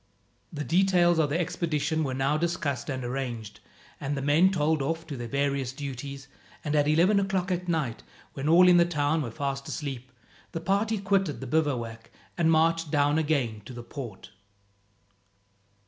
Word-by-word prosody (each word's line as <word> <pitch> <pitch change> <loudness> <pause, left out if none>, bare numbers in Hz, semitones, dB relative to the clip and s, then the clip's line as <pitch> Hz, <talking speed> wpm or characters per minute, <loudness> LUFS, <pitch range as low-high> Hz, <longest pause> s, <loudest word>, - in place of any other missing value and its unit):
The 150 -3 -4
details 175 0 +3
of 150 -2 +2
the 155 +4 0
expedition 160 -2 -1
were 130 -3 -2
now 135 +3 +1
discussed 155 -5 -2
and 130 -2 -3
arranged, 120 -4 -4 0.4
and 140 0 -3
the - - -2
men 155 +6 +5
told 160 -4 +1
off 165 +4 -2
to 155 -3 -6
their 120 -2 -5
various 140 0 -1
duties, 140 0 -6 0.4
and 150 0 -1
at 145 -1 +3
eleven 175 +7 +4
o'clock 195 -1 -1
at 180 0 -2
night, 150 -9 -1 0.3
when 140 +2 -2
all 180 +3 +7
in 180 -1 +7
the 170 - +6
town 155 -1 0
were 125 - -3
fast 140 +3 -4
asleep, 130 -4 -5 0.4
the 165 - -2
party 205 +5 0
quitted 195 -5 0
the 135 - -6
bivouac 120 -6 -1 0.3
and 170 -2 +2
marched 165 0 +2
down 145 +1 +2
again 135 -9 0
to 125 - -9
the 120 0 -8
port. 120 -6 -8
150 Hz, 170 wpm, -27 LUFS, 135-170 Hz, 0.4 s, all